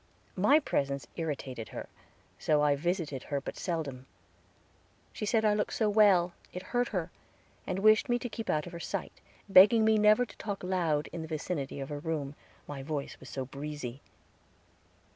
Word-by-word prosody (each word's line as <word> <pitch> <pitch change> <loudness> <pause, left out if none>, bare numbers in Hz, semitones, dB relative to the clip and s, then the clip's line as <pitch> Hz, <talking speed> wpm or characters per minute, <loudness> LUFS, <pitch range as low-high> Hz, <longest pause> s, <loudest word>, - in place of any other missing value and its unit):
My 265 +11 +5
presence 140 - -1
irritated 140 -8 -4
her, - - -7 0.5
so 150 -1 +2
I 145 -1 +4
visited 160 -3 -2
her 140 -1 -1
but 140 - -7
seldom. 140 -7 -4 1.1
She 210 - -4
said 220 0 +2
I 210 - +4
looked 210 0 -1
so 215 -2 +1
well, 195 -5 +5 0.2
it 180 - -6
hurt 245 0 +2
her, 180 -5 -3 0.6
and - - -1
wished 215 +3 +5
me 240 - +3
to 245 - -4
keep 225 -1 -6
out 150 -1 +1
of 175 - -9
her 170 - -6
sight, - - -5 0.3
begged 195 +2 +8
me 220 -1 +4
never 215 +3 +5
to - - -16
talk 200 -3 -5
loud 170 -5 0
in 170 - -4
the 160 - -6
vicinity 155 -3 -3
of 135 - -5
her 145 -1 -4
room, 150 -3 -3 0.3
my 140 -2 -6
voice 145 0 -4
was 130 - -11
so 135 -1 -4
breezy. 140 -1 -6
165 Hz, 180 wpm, -30 LUFS, 145-210 Hz, 1.1 s, begged